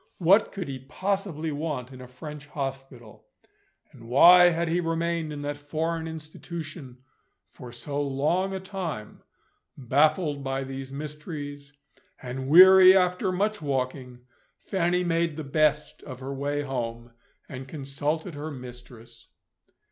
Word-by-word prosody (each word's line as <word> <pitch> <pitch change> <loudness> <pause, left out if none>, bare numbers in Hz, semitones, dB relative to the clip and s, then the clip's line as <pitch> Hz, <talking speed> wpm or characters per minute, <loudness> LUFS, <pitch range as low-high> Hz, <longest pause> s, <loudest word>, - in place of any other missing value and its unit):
What 195 +5 +4
could 190 -5 -5
he 135 -1 -5
possibly 165 +2 -3
want 145 -4 -4
in 130 - -11
a 125 - -10
French 150 +3 -10
hospital? 135 -5 -7 0.6
And 115 -1 -14
why 175 +8 +8
had 170 0 -1
he 170 +2 +1
remained 165 -1 -1
in 145 -1 -6
that 145 0 -3
foreign 160 +3 -3
institution 155 -3 -8 0.5
for 125 - -11
so 140 +4 -4
long 150 +7 0
a 190 - -3
time? 185 - -6 0.6
Baffled 145 +3 +1
by 135 0 -2
these 135 0 -7
mysteries, 145 -1 -7 0.5
and 130 +1 -6
weary 185 +4 +9
after 180 +1 +1
much 205 +2 -1
walking, 130 -3 -3 0.4
Fanny 180 -2 0
made 165 -2 0
the 155 - -5
best 150 +1 0
of 130 -3 -9
her 135 +1 -5
way 145 +1 -2
home, 120 -3 -5 0.4
and 130 0 -8
consulted 150 +4 -3
her 150 +2 -6
mistress. 120 -3 -11
145 Hz, 135 wpm, -26 LUFS, 135-170 Hz, 0.6 s, weary